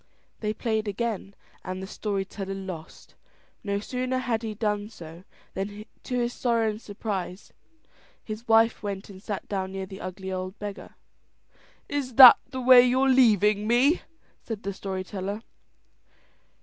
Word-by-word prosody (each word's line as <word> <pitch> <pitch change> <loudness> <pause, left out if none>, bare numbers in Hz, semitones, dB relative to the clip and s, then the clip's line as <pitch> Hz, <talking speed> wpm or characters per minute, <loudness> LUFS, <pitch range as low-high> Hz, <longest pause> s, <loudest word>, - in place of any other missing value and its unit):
They 210 -1 -1
played 220 -1 -2
again, 205 -1 -3 0.3
and 185 0 -5
the 190 - -5
story 195 0 -3
teller 195 0 -6
lost. 185 -5 -9 0.5
No 200 -1 -1
sooner 255 +4 -2
had 240 -3 -1
he 220 -2 -5
done 210 -1 -1
so, 170 -3 -12 0.3
than 205 +2 -5 0.2
to 250 - -3
his 240 0 0
sorrow 230 -3 +1
and 210 +1 -9
surprise, 200 -3 -5 0.7
his 215 +2 -7
wife 225 0 +4
went 200 -1 -5
and 190 -1 -12
sat 205 -2 -5
down 190 -2 -3
near 195 0 -4
the 190 0 -10
ugly 190 +1 -6
old 185 +1 -4
beggar. 205 -1 -8 0.9
"Is 275 -4 -3
that 255 -1 +11
the 260 -1 -5
way 250 0 +9
you're 255 +2 +3
leaving 210 -5 +4
me?" 260 +8 +3 0.4
said 225 -2 -6
the 200 - -3
story 190 -1 -4
teller. 200 +3 -5
210 Hz, 150 wpm, -26 LUFS, 195-235 Hz, 0.9 s, that